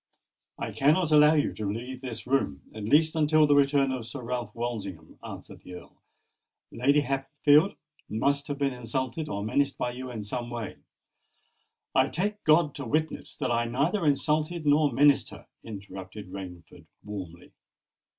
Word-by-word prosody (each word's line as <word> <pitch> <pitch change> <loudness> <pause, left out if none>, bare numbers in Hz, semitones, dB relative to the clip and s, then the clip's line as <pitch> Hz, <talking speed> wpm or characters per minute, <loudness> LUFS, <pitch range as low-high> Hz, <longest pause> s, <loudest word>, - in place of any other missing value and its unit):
"I - - -4
cannot 155 +4 +2
allow 150 +1 +7
you 150 - +1
to 105 -2 -3
leave 125 +4 -6
this 125 -4 -6
room—at 110 - -2
least 155 +4 +4
until 155 0 +4
the 145 - +4
return 140 -1 +3
of 125 -4 -4
Sir 125 +2 -7
Ralph 120 -3 -4
Walsingham," 115 -7 -5
answered - - -9
the 90 - -10
Earl. - - -14 0.7
"Lady 140 +5 +3
Hatfield 145 +5 +2 0.3
must 140 +6 0
have 145 - -3
been 140 -2 0
insulted 130 +5 -3
or 100 0 -3
menaced 140 +5 +1
by 125 - -1
you 130 +1 -7
in 110 -4 -5
some 120 +3 -4
way——" 120 -3 -5 1.2
"I 130 0 +4
take 205 +7 -2
God 155 -1 +4
to 140 - -5
witness 155 +6 -2
that 125 - -1
I 120 0 +1
neither 145 - 0
insulted 155 +3 +1
nor 145 0 +4
menaced 140 +3 +4
her!" - - -12 0.2
interrupted 95 -2 -9
Rainford, 90 -4 -10 0.2
warmly. 90 -5 -8
130 Hz, 155 wpm, -28 LUFS, 115-150 Hz, 1.2 s, allow